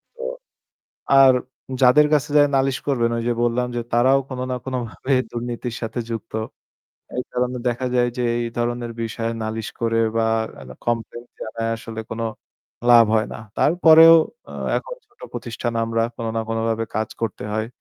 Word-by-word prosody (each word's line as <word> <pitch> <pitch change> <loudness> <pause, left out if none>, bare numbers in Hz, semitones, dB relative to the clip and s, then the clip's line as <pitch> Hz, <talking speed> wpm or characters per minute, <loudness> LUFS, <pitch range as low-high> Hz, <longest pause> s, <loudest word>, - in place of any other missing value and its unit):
তো 485 - -8 1.0
আর 135 -1 +8 0.5
যাদের 150 +4 +7
কাছে 145 0 0
যেয়ে 145 -1 +6
নালিশ 135 -1 +1
করবেন, 120 -4 +2
ওই 115 - -2
যে - - +3
বললাম 120 +1 +1
যে, - - 0
তারাও 130 +3 +4
কোনো 130 0 -4
না 125 - -1
কোনোভাবে 130 +1 -3 0.2
দুর্নীতির 120 0 -4
সাথে 115 +1 -3
যুক্ত। 115 - -5 0.8
এই 125 - 0
কারণে 125 0 -1
দেখা 120 +2 -2
যায় 120 0 +3
যে, - - 0 0.2
এই 115 - -2
ধরনের 120 0 -2
বিষয়ে 115 0 -3
নালিশ 110 0 -3
করে 115 0 +1 0.2
বা 115 0 +2 0.3
আ - - -10 0.2
complaint 120 +1 -3
জানায় 115 +1 -3
আসলে 110 0 -7
কোনো 115 +1 -3 0.7
লাভ 120 -1 +9
হয় 110 0 +2
না। - - -7 0.2
তারপরেও 165 -1 +7 0.4
আ - - -9 0.3
এখন - - -8
ছোট 410 +2 -34
প্রতিষ্ঠান 120 0 -4
আমরা, 115 0 0
কোনো 115 -1 -3
না 115 - 0
কোনোভাবে 115 0 -1
কাজ 110 - -1
করতে 110 -3 -3
হয়। 110 +1 -1
120 Hz, 165 wpm, -22 LUFS, 115-130 Hz, 1.0 s, লাভ